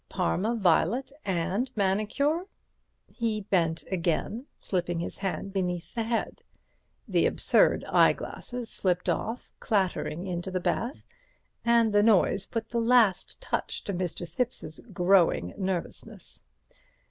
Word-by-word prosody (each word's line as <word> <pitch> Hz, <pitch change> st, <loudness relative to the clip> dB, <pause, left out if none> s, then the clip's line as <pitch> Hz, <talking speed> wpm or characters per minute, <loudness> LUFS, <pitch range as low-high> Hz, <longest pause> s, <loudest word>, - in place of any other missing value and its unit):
"Parma 210 Hz, -, 0 dB
violet 220 Hz, -, +2 dB
and 190 Hz, +6 st, 0 dB
manicure." 215 Hz, -, +1 dB, 0.7 s
He 225 Hz, -3 st, -1 dB
bent 170 Hz, -5 st, 0 dB
again, 190 Hz, -, -1 dB
slipping 175 Hz, -2 st, -2 dB
his 170 Hz, -, -5 dB
hand 195 Hz, 0 st, -3 dB
beneath 180 Hz, -3 st, -2 dB
the 235 Hz, -, -1 dB
head. 230 Hz, +1 st, -2 dB, 0.7 s
The -, -, +3 dB
absurd -, -, +3 dB
eyeglasses 245 Hz, -2 st, +1 dB
slipped 180 Hz, -2 st, 0 dB
off, 230 Hz, +3 st, -2 dB
clattering 190 Hz, -4 st, -1 dB
into 175 Hz, 0 st, -3 dB
the 185 Hz, -1 st, -1 dB
bath, 235 Hz, +8 st, -2 dB, 0.6 s
and 235 Hz, -2 st, +4 dB
the 205 Hz, -, +5 dB
noise 205 Hz, -2 st, +3 dB
put 230 Hz, -1 st, -4 dB
the 235 Hz, -1 st, 0 dB
last 230 Hz, -6 st, +3 dB
touch -, -, -3 dB
to 200 Hz, -, -3 dB
Mr. 175 Hz, -1 st, -3 dB
Thipps's 170 Hz, -4 st, -3 dB
growing 175 Hz, -, +3 dB
nervousness. 185 Hz, -3 st, -5 dB
195 Hz, 120 wpm, -28 LUFS, 180-230 Hz, 0.7 s, the